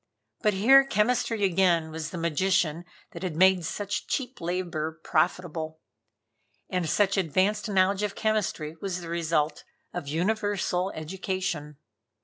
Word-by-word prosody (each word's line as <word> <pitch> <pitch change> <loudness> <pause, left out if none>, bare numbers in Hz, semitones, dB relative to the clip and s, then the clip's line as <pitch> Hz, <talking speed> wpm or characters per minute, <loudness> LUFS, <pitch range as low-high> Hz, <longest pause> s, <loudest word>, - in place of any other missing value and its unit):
But 210 -2 +2
here 265 +8 +7
chemistry 230 -2 +1
again 175 -4 +2
was 160 0 -4
the 175 - -6
magician 170 0 +1 0.3
that - - -9
had 180 -5 -3
made 185 +1 +5
such 205 +4 -3
cheap 255 -4 -3
labor 165 -2 -3
profitable. 160 -1 -1 0.9
And 180 -4 0
such 200 +2 +2
advanced 195 +5 +1
knowledge 195 0 +2
of 210 -1 -2
chemistry 205 -8 -1
was 185 -2 -3
the 170 - -8
result 160 -3 0 0.3
of 175 -5 -5
universal 190 +2 0
education. 170 -3 -4
180 Hz, 130 wpm, -27 LUFS, 160-200 Hz, 0.9 s, here